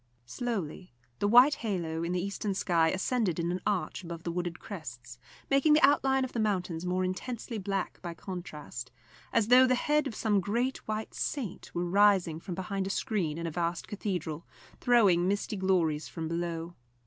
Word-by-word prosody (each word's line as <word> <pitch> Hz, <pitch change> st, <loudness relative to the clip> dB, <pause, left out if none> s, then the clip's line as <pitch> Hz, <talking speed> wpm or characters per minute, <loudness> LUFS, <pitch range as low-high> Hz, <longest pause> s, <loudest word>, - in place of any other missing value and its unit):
Slowly 185 Hz, -, -4 dB, 0.2 s
the 205 Hz, -, +2 dB
white 245 Hz, +7 st, +7 dB
halo 170 Hz, -7 st, -2 dB
in 170 Hz, -, -2 dB
the 180 Hz, -, 0 dB
eastern 200 Hz, 0 st, -2 dB
sky 170 Hz, -4 st, +2 dB
ascended 185 Hz, -1 st, 0 dB
in 170 Hz, +1 st, 0 dB
an 180 Hz, -, -3 dB
arch 190 Hz, -3 st, -1 dB
above 170 Hz, -1 st, -7 dB
the 170 Hz, -, -2 dB
wooded 175 Hz, 0 st, -3 dB
crests, 125 Hz, -, -8 dB, 0.3 s
making 275 Hz, +2 st, +4 dB
the 305 Hz, -, +4 dB
outline 270 Hz, -2 st, +3 dB
of 260 Hz, -, -9 dB
the 235 Hz, -, -2 dB
mountains 180 Hz, -5 st, -1 dB
more 185 Hz, +1 st, +1 dB
intensely 225 Hz, +4 st, -4 dB
black 195 Hz, -1 st, -3 dB
by 170 Hz, -2 st, -6 dB
contrast, 150 Hz, -9 st, -7 dB, 0.4 s
as 225 Hz, -1 st, +2 dB
though 255 Hz, +1 st, +8 dB
the 255 Hz, -, +3 dB
head 300 Hz, +3 st, +1 dB
of 230 Hz, -, -6 dB
some 210 Hz, -3 st, +2 dB
great 235 Hz, +8 st, 0 dB
white 215 Hz, 0 st, -3 dB
saint 240 Hz, -, -4 dB
were 175 Hz, +1 st, 0 dB
rising 185 Hz, -3 st, +4 dB
from 175 Hz, +1 st, -6 dB
behind 190 Hz, +1 st, -3 dB
a -, -, -3 dB
screen 195 Hz, -8 st, -1 dB
in 170 Hz, -, -4 dB
a 165 Hz, -, -2 dB
vast 170 Hz, +1 st, -2 dB
cathedral, 180 Hz, -6 st, -4 dB, 0.3 s
throwing 200 Hz, -8 st, +4 dB
misty 205 Hz, +2 st, -1 dB
glories 175 Hz, -6 st, +1 dB
from 165 Hz, -2 st, -5 dB
below. 170 Hz, 0 st, -3 dB
185 Hz, 180 wpm, -30 LUFS, 170-220 Hz, 0.4 s, though